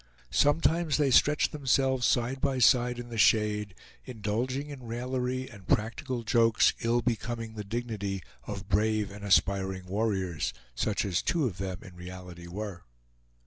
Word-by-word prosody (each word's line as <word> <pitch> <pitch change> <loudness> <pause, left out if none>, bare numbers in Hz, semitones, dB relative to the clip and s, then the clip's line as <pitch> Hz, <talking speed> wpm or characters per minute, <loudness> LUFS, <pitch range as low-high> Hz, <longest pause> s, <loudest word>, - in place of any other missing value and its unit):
Sometimes 160 +1 +3
they 145 -3 +2
stretched 150 +4 +4
themselves 130 -3 +2
side 125 +2 0
by 135 -2 +1
side 125 0 +4
in 120 0 -7
the 115 -1 -4
shade, 105 -2 +3 0.3
indulging 125 +5 -3
in 140 -2 -8
raillery 125 +2 -2
and 100 -5 -14
practical 120 +3 -1
jokes 115 0 +4
ill 115 +1 +1
becoming 115 -1 -2
the 105 -1 -5
dignity 105 -3 -3 0.2
of 100 -2 -6
brave 105 +1 +1
and 100 0 -10
aspiring 95 -1 +2
warriors, 95 - -1 0.2
such 100 - 0
as 95 -3 0
two 165 -5 +1
of 95 -7 -3
them 95 -2 -4
in 90 - -12
reality 90 -1 -9
were. 95 0 -6
110 Hz, 145 wpm, -29 LUFS, 100-125 Hz, 0.3 s, stretched